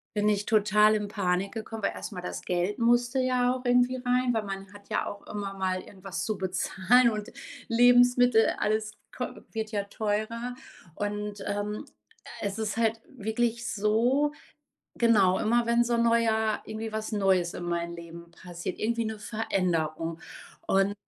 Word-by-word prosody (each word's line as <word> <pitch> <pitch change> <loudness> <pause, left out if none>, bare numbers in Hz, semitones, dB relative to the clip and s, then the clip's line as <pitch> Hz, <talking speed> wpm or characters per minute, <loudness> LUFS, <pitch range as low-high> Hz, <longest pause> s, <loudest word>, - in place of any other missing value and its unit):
bin 210 0 +2
ich 205 -1 0
total 210 0 +4
in 210 -1 -2
Panik 190 -1 0
gekommen, 220 -1 -6
weil - - +2
erstmal 185 -5 -6
das - - -5
Geld 180 +4 -1
musste 240 +2 +3
ja 255 -1 +2
auch 255 0 -6
irgendwie 245 +1 +3
rein, 250 0 +1
weil 220 -1 0
man 195 0 -7
hat 205 0 -15
ja - - 0
auch 205 - -8
immer 200 -1 -4
mal 185 -1 -1
irgendwas 195 -1 -7
zu 215 -2 -2
bezahlen 190 +6 +3
und 210 -1 -5 0.4
Lebensmittel, 245 -1 +5
alles 215 0 0 0.2
ko - - -1 0.3
wird 220 0 -4
ja 205 -1 -1
teurer 220 +4 -2 0.4
und, 205 0 -4
ähm, 205 +1 -3 0.6
es 200 +1 -2
ist 215 -1 -2
halt 225 0 +1
wirklich 235 0 -2
so 235 +8 +2 0.7
genau, 200 -6 +4
immer 235 +2 +2
wenn 235 0 +4
so 240 - -1
'n 235 - +2
neuer 225 -2 +2
irgendwie 220 0 -5
was 220 +1 -3
Neues 190 -4 +2
in 175 - -5
meinem 170 0 -2
Leben 170 0 -11
passiert. 175 0 -7
Irgendwie 230 +1 0
'ne 220 -1 -4
Veränderung 170 -7 -1 0.5
und, 195 +1 +3
215 Hz, 160 wpm, -28 LUFS, 195-235 Hz, 0.7 s, Lebensmittel